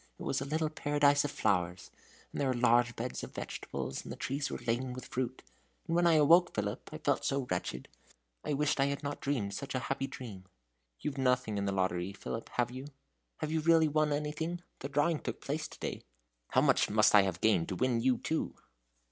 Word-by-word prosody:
It - - -8
was - - -1
a - - -2
little 155 +2 -1
paradise 145 -1 +3
of - - -1
flowers 90 -10 0 0.4
and - - -3
there 140 - +2
were 130 - +1
large 120 0 +3
beds 65 - -4
of - - -8
vegetables, 65 - -4
and - - -8
the - - -4
trees 140 +2 -2
were - - -3
laden 125 +2 -1
with 130 0 -7
fruit. 130 0 -3 0.4
And 165 - -1
when 175 0 +4
I 170 - +5
awoke, 165 +4 +5
Philip, 105 +2 -3
I 155 - -5
felt 145 -3 0
so 135 -1 0
wretched 65 -8 -2 0.6
I - - -1
wished 150 0 +1
I 135 - +5
had 140 +1 -2
not 145 0 -4
dreamed 120 -8 -1
such 135 +6 -5
a 130 - -3
happy 135 0 -3
dream. 105 -10 -8 0.6
You've 140 -2 -3
nothing 125 -5 +1
in 100 - -1
the 100 - 0
lottery, 95 0 0
Philip, 115 +3 -6
have 120 0 +1
you? 130 +3 -7 0.5
Have 155 - -2
you 160 - +1
really 160 0 +5
won 155 0 +2
anything? 155 +4 -2 0.2
The 140 - -5
drawing 145 +3 +2
took - - -5
place 155 +2 -3
to - - -13
day." - - -4 0.5
"How - - +3
much - - +3
must 105 +1 +4
I 105 - +9
have 95 -3 -2
gained 110 -7 +3
to 95 - -2
win 125 +1 +1
you 130 +1 +3
too?" 160 - -2
135 Hz, 215 wpm, -32 LUFS, 110-150 Hz, 0.6 s, I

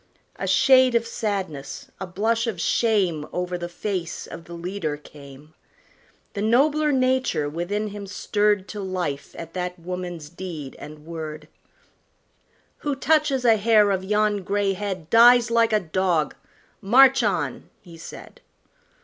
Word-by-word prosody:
A - - -4
shade 260 -2 +5
of 230 0 +2
sadness, 195 -11 -4
a 190 - -5
blush 225 +6 0
of 210 -7 -3
shame, 185 -6 +1
Over 180 0 -3
the 175 -1 -5
face 175 -1 -4
of 165 - -10
the 170 - -9
leader 170 -3 -4
came; 145 0 -14 0.8
The 200 - -4
nobler 290 +7 +3
nature 255 - +1
within 185 +8 -3
him 200 -1 -8
stirred 205 0 0
To 210 - -6
life 180 -7 -4
at 165 0 -8
that 180 0 -4
woman's 175 -2 -6
deed 170 -6 -7
and 150 +1 -11
word: 155 -2 -7 1.3
"Who 290 -2 -2
touches 275 -2 +1
a 225 -2 +6
hair 210 -1 +4
of 190 -1 -1
yon 210 +1 +1
gray 200 +1 0
head 190 -4 -5
Dies 240 +1 +6
like 230 -1 +3
a 215 - +3
dog; 175 -3 0 0.5
march 260 +6 +6
on!" - - -2
he 170 -3 -13
said. 165 - -11
195 Hz, 140 wpm, -23 LUFS, 170-230 Hz, 1.3 s, a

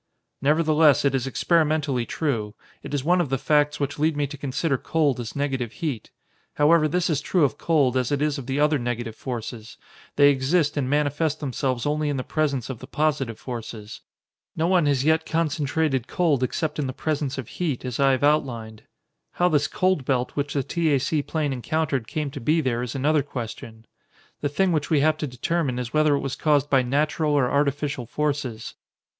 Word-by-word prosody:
"Nevertheless, 150 0 +4
it 140 - +3
is 135 -1 -1
experimentally 150 -3 +1
true. 110 -9 -2 0.3
It - - -8
is 140 - -1
one 175 +4 +3
of 155 - -2
the 135 - 0
facts 150 +2 +2
which 140 +1 -3
lead 155 0 +1
me 145 - +1
to 145 +2 -7
consider 140 +2 -1
cold 150 -5 +1
as 120 -2 -6
negative 135 -5 -2
heat. 145 -10 -4 0.5
However, 155 +1 +4
this 180 +3 0
is 150 -5 0
true 175 +2 +1
of 145 0 +1
cold, 145 -6 +2
as 130 +1 0
it 145 - +1
is 150 -1 0
of 130 - -8
the 135 +1 -1
other 150 0 +3
negative 120 -2 -3
forces; 115 -3 -6 0.4
they 145 0 +6
exist 145 +3 +1
and 135 -3 -1
manifest 145 +1 0
themselves 130 -3 -2
only 150 0 0
in 145 - -1
the 130 - -2
presence 140 -6 -1
of 130 -4 -6
the 130 - -10
positive 145 -6 -1
forces. 115 -3 -7 0.5
No 160 - 0
one 175 -3 +3
has 140 -2 +2
yet 160 0 +3
concentrated 155 -4 0
cold 160 -7 +1
except 150 +4 -2
in 140 - -1
the 130 - -4
presence 145 -2 -2
of 130 -5 -5
heat, 150 -8 -3
as 125 0 -4
I 135 -1 +4
have 130 - -1
outlined. 120 -7 0 0.5
How 180 0 +2
this 145 -3 +2
cold 185 -6 +1
belt 125 -1 0
which 145 0 -3
the 140 - +1
T. 165 +2 0
A. - - +2
C. 150 +3 0
plane 150 -1 -2
encountered 135 -1 -1
came 150 -3 -3
to 135 - -7
be 155 +7 +2
there 125 -5 0
is 125 +1 -4
another 145 +3 +2
question. 115 -4 -7 0.5
The 145 - -1
thing 180 +6 +1
which 155 -3 -1
we 150 -3 +3
have 155 +1 +3
to 150 - -3
determine 135 +1 -1
is 125 -2 -4
whether 155 -1 +4
it - - -1
was 135 - -3
caused 145 -2 +1
by 135 -2 +5
natural 150 +4 0
or 135 -4 +2
artificial 140 -2 0
forces." 140 -5 -3
145 Hz, 200 wpm, -24 LUFS, 130-155 Hz, 0.5 s, they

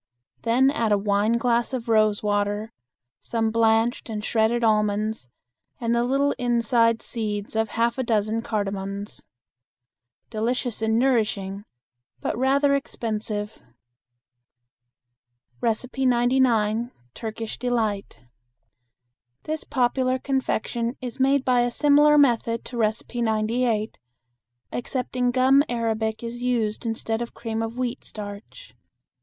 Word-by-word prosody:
Then 255 +4 +3
add 230 -7 0
a 205 - +5
wineglass 230 +5 +1
of 245 -3 -3
rose 215 -2 +3
water, 205 +2 -1 0.5
some 225 -1 -1
blanched 225 +1 +2
and 215 -1 -4
shredded 230 +1 +1
almonds 210 - +1 0.5
and 235 -1 0
the 235 0 +2
little 275 +3 +2
inside 235 -1 +2
seeds 210 -3 -4
of 220 0 +1
half 235 +2 +1
a - - +1
dozen 220 -1 0
cardamons. 200 -2 -4 1.1
Delicious 235 +1 -2
and 220 0 +2
nourishing, 210 -6 0 0.5
but - - -2
rather 275 +3 +3
expensive. 215 -5 -3 2.0
99. 245 -1 +1 0.2
Turkish 220 0 -6
Delight. 225 -5 -2 1.2
This 310 0 -4
popular 255 0 +1
confection 250 -3 -2
is 250 -1 -7
made 270 +1 +3
by 250 -1 +3
a 240 - +1
similar 295 +3 +5
method 235 -4 +2
to 250 - -8
No. 215 -2 +3 0.3
98, 220 0 0 0.7
excepting 250 0 -2
gum 260 +3 +4
arabic 225 -2 -1
is 235 +1 -6
used 230 -3 -1
instead 225 0 -2
of 235 - -6
cream 225 -1 -3
of 225 +1 -4
wheat 250 -2 -3
starch. 210 - -9
230 Hz, 110 wpm, -24 LUFS, 215-250 Hz, 2.0 s, a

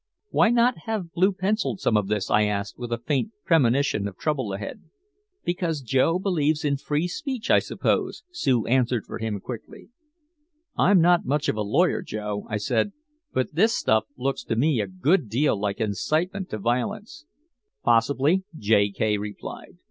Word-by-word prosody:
"Why - - +4
not 240 +1 +3
have 210 -7 -3
blue 185 +4 +3
penciled 190 - -1
some 115 - +1
of 105 -2 +2
this?" 105 -1 -1
I 105 0 +4
asked, 105 0 -2
with 120 -1 -5
a 120 - 0
faint 145 - -1
premonition 135 - +2
of 95 -2 -9
trouble 135 -9 -1
ahead. 100 +1 -6 0.6
"Because 175 -3 -1
Joe 135 +8 +2
believes 160 -5 0
in 140 -1 +1
free 150 +4 -1
speech, 265 - -3
I - - +7
suppose," - - -1
Sue 130 - +1
answered 125 -2 +1
for - - -7
him 110 -2 -3
quickly. 120 - -9 0.9
"I'm 190 -2 +5
not 175 +1 +4
much 145 +2 +1
of - - 0
a 110 - -2
lawyer, 105 - +2
Joe," 105 -1 -5
I 110 - -1
said. 120 - 0 0.4
"But 130 - -1
this 220 +8 +3
stuff 110 0 +2
looks 135 +2 -2
to - - -1
me 130 0 +2
a 100 - -3
good 125 - +1
deal 130 +6 +2
like 100 -1 -2
incitement 160 - -1
to 110 - -4
violence." 160 - -3 0.6
"Possibly," 140 +9 +3
J. 105 -3 +3
K 105 +1 0
replied. 105 0 -8
130 Hz, 170 wpm, -25 LUFS, 110-175 Hz, 0.9 s, I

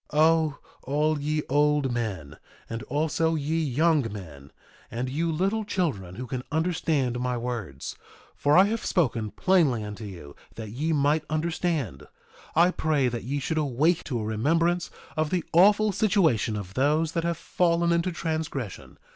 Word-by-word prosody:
2:40 150 - +1
O, 160 -2 +4 0.2
all 150 +2 0
ye 150 +1 -1
old 145 -2 +2
men, 95 -11 -4 0.3
and 115 0 -5
also 160 +3 0
ye 155 +1 -1
young 150 -3 +2
men, 75 -9 -10 0.4
and 125 +2 -3
you 165 +4 0
little 195 +7 0
children 135 - -2
who 125 - -5
can 125 0 -4
understand 155 -6 0
my 125 0 -1
words, 115 - -5 0.4
for 145 +2 +3
I 185 - +9
have 220 +3 -1
spoken 120 - 0
plainly 150 - +2
unto 105 +1 -7
you 85 -8 -10 0.2
that 110 -2 -7
ye 150 +8 -1
might 150 +1 +2
understand, 155 - -2 0.5
I 170 +3 +5
pray 150 -7 +1
that 120 -1 -5
ye 140 +3 -2
should 155 +4 -1
awake 150 +4 +1
to 125 -5 -2
a - - -3
remembrance 165 +11 +1 0.3
of 155 -1 0
the 180 -1 0
awful 205 +5 +5
situation 175 - +2
of 100 -2 -6
those 150 +6 +2
that 165 0 -1
have 170 -1 -1
fallen 170 0 +1
into 170 +2 +1
transgression. 155 - -4
150 Hz, 160 wpm, -26 LUFS, 120-165 Hz, 0.5 s, I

